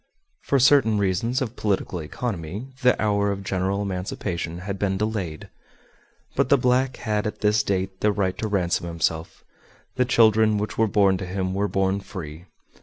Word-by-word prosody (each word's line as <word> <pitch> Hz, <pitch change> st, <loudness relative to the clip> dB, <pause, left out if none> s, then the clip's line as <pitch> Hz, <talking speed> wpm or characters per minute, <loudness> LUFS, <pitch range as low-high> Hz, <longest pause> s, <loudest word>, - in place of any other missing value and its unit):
For 140 Hz, -, +1 dB
certain 130 Hz, -4 st, +5 dB
reasons 105 Hz, +7 st, 0 dB
of 120 Hz, -1 st, -6 dB
political 95 Hz, -3 st, -1 dB
economy 95 Hz, -, -5 dB
the 125 Hz, 0 st, +4 dB
hour 100 Hz, -1 st, +1 dB
of 100 Hz, 0 st, -4 dB
general 95 Hz, +1 st, -1 dB
emancipation 90 Hz, -3 st, -4 dB
had 100 Hz, +1 st, -5 dB
been 95 Hz, -2 st, 0 dB
delayed, 100 Hz, -7 st, -3 dB, 0.9 s
but -, -, +1 dB
the 140 Hz, -, +6 dB
black 125 Hz, +1 st, +1 dB
had 105 Hz, -2 st, -1 dB
at 105 Hz, -, -6 dB
this 105 Hz, 0 st, +3 dB
date 95 Hz, -1 st, -2 dB
the 105 Hz, -, +3 dB
right 95 Hz, -3 st, -1 dB
to 110 Hz, -, -1 dB
ransom 90 Hz, -4 st, 0 dB
himself, 80 Hz, -1 st, -2 dB, 0.5 s
the 125 Hz, -, +3 dB
children 110 Hz, -3 st, +4 dB
which 105 Hz, +1 st, -3 dB
were 115 Hz, -, +2 dB
born 100 Hz, -2 st, +3 dB
to 95 Hz, -, -4 dB
him 95 Hz, 0 st, -2 dB
were 100 Hz, +1 st, 0 dB
born 95 Hz, +1 st, 0 dB
free. 85 Hz, -4 st, -8 dB
100 Hz, 170 wpm, -24 LUFS, 95-110 Hz, 0.9 s, the